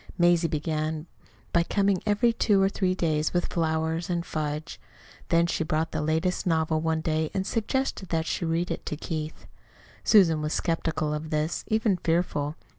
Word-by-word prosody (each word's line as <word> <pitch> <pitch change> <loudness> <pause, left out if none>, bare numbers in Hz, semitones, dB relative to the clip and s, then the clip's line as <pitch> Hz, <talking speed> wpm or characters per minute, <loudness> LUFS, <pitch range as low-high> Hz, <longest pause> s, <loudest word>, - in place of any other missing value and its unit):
Mazie 175 -1 +4
began 155 0 -2 0.5
by 170 - +5
coming 195 +2 +1
every 230 +3 +3
two 210 -3 +3
or 195 0 +4
three 185 -2 0
days 155 -2 0
with 175 - 0
flowers 160 0 0
and 170 -1 -1
fudge. 150 -1 -4 0.5
Then 170 0 +4
she 170 -1 -1
brought 160 +1 -1
the 155 - -2
latest 160 +5 0
novel 160 -1 +1
one 160 0 0
day 155 -1 0
and 190 -1 0
suggested 225 -2 -1
that 160 -1 0
she - - -2
read 165 +1 0
it - - -3
to 150 - -3
Keith. 155 -1 -5 0.6
Susan 170 -8 +5
was 150 +1 -2
skeptical 160 -2 -1
of 155 +1 -4
this, 155 +2 -1
even 220 -3 +2
fearful. 160 -3 0
165 Hz, 170 wpm, -27 LUFS, 155-180 Hz, 0.6 s, by